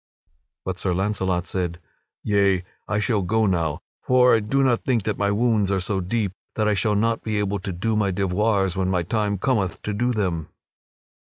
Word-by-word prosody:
But 95 -1 -3
Sir 90 -1 0
Launcelot 95 -2 0
said: 90 -2 -3 0.4
"Yea, 100 -3 +2 0.2
I 105 - 0
shall 105 -1 +1
go 110 +5 +1
now; 85 -6 0 0.2
for 125 0 +4
I - - +3
do 135 +6 +1
not 125 -3 +2
think 120 -5 +1
that 105 0 -2
my 100 0 +2
wounds 105 -2 +2
are 95 - +1
so 95 +2 -1
deep 100 +2 -1 0.2
that 110 -1 +1
I 105 - +3
shall 105 +1 +1
not 115 +2 +1
be 110 -1 -2
able 100 -1 -1
to 95 0 -5
do 110 +6 -1
my 105 -2 +2
devoirs 95 0 +1
when 95 -1 0
my 90 -2 +1
time 105 +1 -1
cometh 100 -5 0
to 105 - -2
do 120 +5 0
them." 90 -8 -2
100 Hz, 195 wpm, -23 LUFS, 95-110 Hz, 0.4 s, for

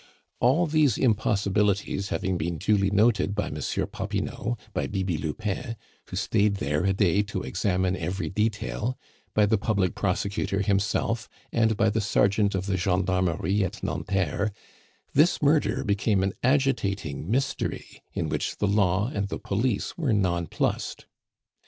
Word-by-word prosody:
All 135 +9 +4
these 150 -4 +3
impossibilities 100 -3 +1
having 95 -2 -1
been 85 0 -2
duly 100 +1 +2
noted 105 0 +2
by 105 - -2
Monsieur 75 -1 -2
Popinot, 120 +3 -3 0.2
by - - -1
Bibi 95 -3 -1
Lupin, 100 +8 -3 0.3
who - - -7
stayed 105 -2 +2
there 75 -1 -1
a 95 - +3
day 95 0 +3
to 100 -2 -4
examine 95 -1 0
every 90 -1 -3
detail, 110 +5 -1 0.4
by 105 - +5
the 105 0 +2
public 100 -4 +1
prosecutor 100 0 -1
himself, 105 +3 0 0.2
and 110 -2 +2
by 110 0 +3
the 110 +1 0
sergeant 100 0 +2
of 95 0 -2
the 95 -1 0
gendarmerie 95 +1 +1
at 95 - -4
Nanterre, 100 +2 -1 0.6
this 155 +6 +4
murder 140 -5 +2
became 100 -1 +1
an 95 0 0
agitating 100 - 0
mystery, 135 +4 -2
in - - -2
which - - -2
the - - 0
Law 100 0 +2
and 100 -1 -1
the - - -4
Police 110 - -1
were 140 -8 +1
nonplussed. 85 -5 -1
100 Hz, 140 wpm, -26 LUFS, 95-110 Hz, 0.6 s, by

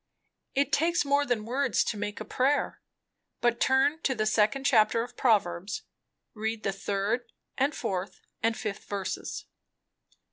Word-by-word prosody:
_ - - -56 0.5
It 280 +1 +2
takes 330 +1 +3
more 285 +1 +2
than 225 -4 0
words 255 0 +1
to - - -2
make 205 0 -4
a 215 - -5
prayer. 265 +6 +1 0.6
But 240 -1 +2
turn 270 +4 +3
to 265 - +1
the 215 -1 0
second 220 +5 +2
chapter 230 -3 +4
of 245 - -10
Proverbs. 195 -5 +1 0.5
Read 220 0 -3
the 195 - +1
third 205 +5 -1 0.2
and 275 +3 +1
fourth 185 +1 -3 0.2
and 225 0 +1
fifth 210 -1 -4
verses." 195 -2 -4
225 Hz, 150 wpm, -28 LUFS, 205-265 Hz, 0.6 s, chapter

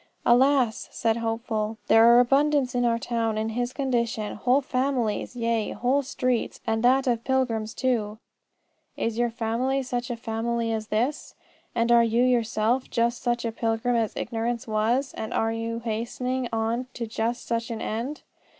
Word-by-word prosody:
"Alas!" 255 -1 +3
said 225 -1 0
Hopeful, 225 -1 -2
"there 225 +1 +6
are 240 - +7
abundance 275 +1 +3
in 245 -1 +1
our 230 -1 +2
town 230 -2 -1
in 220 +1 -1
his 245 +2 -2
condition: 235 -6 -1
whole 250 +5 +3
families, 255 -4 -1
yea, 230 -2 -1
whole 260 +4 +1
streets, 255 -3 -1
and 225 0 0
that 260 +3 +4
of 235 -3 0
pilgrims 240 -5 0
too." 220 -5 -1 0.8
Is 230 0 -2
your 240 0 +2
family 240 +4 -1
such 245 -1 -3
a 240 - -2
family 230 0 -2
as 215 -1 -3
this? 240 +8 -2 0.4
And 235 0 +2
are 235 0 +6
you 230 +1 +2
yourself 240 0 +1
just 235 +1 0
such 240 -1 -1
a 230 - -1
pilgrim 225 +2 0
as 225 -2 0
Ignorance 235 0 -3
was, 225 +5 0
and 220 - -5
are 225 0 +1
you 230 0 -3
hastening 240 +3 -2
on 230 +3 -1
to 235 - -3
just 230 +2 -2
such 230 0 -2
an 230 -1 -4
end? 235 +8 -4
235 Hz, 165 wpm, -26 LUFS, 225-250 Hz, 0.8 s, are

